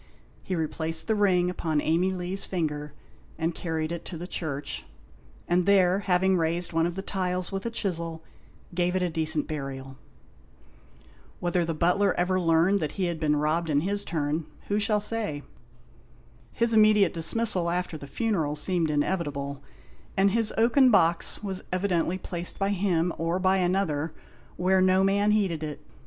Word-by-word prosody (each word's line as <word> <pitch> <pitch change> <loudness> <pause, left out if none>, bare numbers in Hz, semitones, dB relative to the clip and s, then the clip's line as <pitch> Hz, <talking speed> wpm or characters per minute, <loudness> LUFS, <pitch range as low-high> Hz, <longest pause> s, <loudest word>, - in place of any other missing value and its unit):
He 185 - -3
replaced 160 0 0
the 220 - +1
ring 190 -4 +3
upon 160 -4 -1
Amey 170 +5 +1
Lee's 185 +1 -2
finger 150 -5 -3 0.5
and 165 +1 -1
carried 160 -1 -3
it 170 - -4
into 175 - -7
the 175 - -6
church, 150 -6 -4 0.6
and 175 +1 +1
there, 190 -1 +4
having 190 -1 +2
raised 170 +1 -1
one 165 +1 +2
of 175 - -5
the 195 - -5
tiles 185 -2 -2
with 195 +3 -3
a - - -1
chisel, 170 -7 -3 0.5
gave 180 +1 0
it 180 -1 +1
decent 160 -2 +1
burial. 135 -3 -6 1.4
Whether 175 0 0
the 165 -1 -2
butler 180 +4 +2
ever 185 +1 +1
learned 170 +3 +3
that 155 -4 -3
he 190 - -1
had 170 -2 -2
been 150 -2 +2
robbed 155 +3 0
in 145 -1 +2
his 200 +4 -1
turn, 155 -1 -2 0.2
who 205 +1 +1
shall 210 0 +1
say? 210 -9 -1 1.1
His 235 0 +1
immediate 215 -4 +5
dismissal, 180 +1 +2
after 180 -1 -2
the 145 -2 -8
funeral, 165 - -1
seemed 165 +1 0
inevitable, 145 -3 -2 0.6
and 195 +1 +4
his 225 0 +2
oaken 245 +4 +5
box 170 -3 +2
was 190 -2 -4
evidently 185 -1 0
placed 175 -2 -5
by 195 0 0
him, 180 -4 +1
or 165 +2 0
by 190 +1 +2
another, 175 -4 0 0.4
where 185 +1 +3
no 185 +1 +4
man 200 +2 +2
heeded 195 -7 +1
it. 150 -2 -5
175 Hz, 160 wpm, -27 LUFS, 160-195 Hz, 1.4 s, immediate